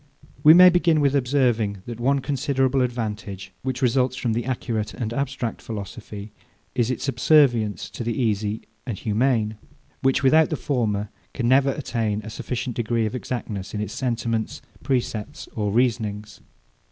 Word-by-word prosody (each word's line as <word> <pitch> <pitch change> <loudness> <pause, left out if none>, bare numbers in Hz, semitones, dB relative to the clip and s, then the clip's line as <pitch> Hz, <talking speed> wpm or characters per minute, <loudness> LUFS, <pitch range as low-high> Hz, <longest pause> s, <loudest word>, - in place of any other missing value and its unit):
We 155 +2 +9
may 180 0 +9
begin 170 -3 +3
with 140 -1 +2
observing, 120 -7 +1
that 120 -1 -7
one 135 +3 +2
considerable 135 -1 +1
advantage, 105 -6 -3
which 130 0 -3
results 125 +1 +2
from 120 -3 -1
the 120 +2 -2
accurate 115 -4 -2
and 115 -3 -3
abstract 130 -3 -3
philosophy, 105 -1 -7 0.4
is, 120 -2 +1
its 130 - -2
subserviency 125 -5 +3
to - - -4
the 115 +3 -2
easy 110 -2 0 0.2
and 115 -6 -3
humane; 110 0 0 0.4
which, 135 +2 +2
without 155 +4 +5
the 155 - -1
former, 105 -7 -1 0.3
can 120 -3 0
never 135 +2 +5
attain 115 -6 -2
a 110 - -7
sufficient 120 +1 -4
degree 115 -1 0
of 110 - -3
exactness 115 -6 -4
in - - -2
its 105 0 -3
sentiments, 115 -3 -2 0.2
precepts, 120 -5 -2
or 105 -2 -1
reasonings. 110 -3 -1
120 Hz, 155 wpm, -24 LUFS, 110-130 Hz, 0.4 s, We